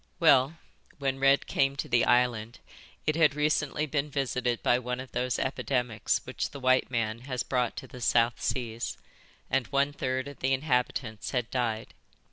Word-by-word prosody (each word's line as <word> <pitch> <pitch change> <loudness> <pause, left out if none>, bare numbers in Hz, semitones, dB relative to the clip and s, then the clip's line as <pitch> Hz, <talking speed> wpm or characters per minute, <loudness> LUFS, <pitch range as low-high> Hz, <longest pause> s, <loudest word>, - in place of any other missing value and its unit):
"Well, 140 -2 +5 0.4
when 135 -2 -1
Red 135 +1 +4
came 135 0 +1
to - - -4
the 120 0 +3
island 120 -2 +2 0.5
it 155 - +1
had 155 -4 +4
recently 150 0 +1
been 150 0 -1
visited 125 -4 -1
by 120 - +4
one 125 0 -3
of 130 0 -8
those 125 0 -1
epidemics 125 -4 -1
which - - -3
the 140 - -9
white 130 -1 +3
man 115 -2 -1
has 125 -2 -1
brought 125 -2 -1
to - - -6
the 125 -3 -11
South 115 0 +2
Seas, 120 -2 -2 0.5
and 135 -2 0
one 140 +1 +1
third 130 -1 -2
of 140 - -10
the 135 +1 +1
inhabitants 125 -5 -1
had 125 -3 -2
died. 115 -3 -2
130 Hz, 170 wpm, -29 LUFS, 120-140 Hz, 0.5 s, Well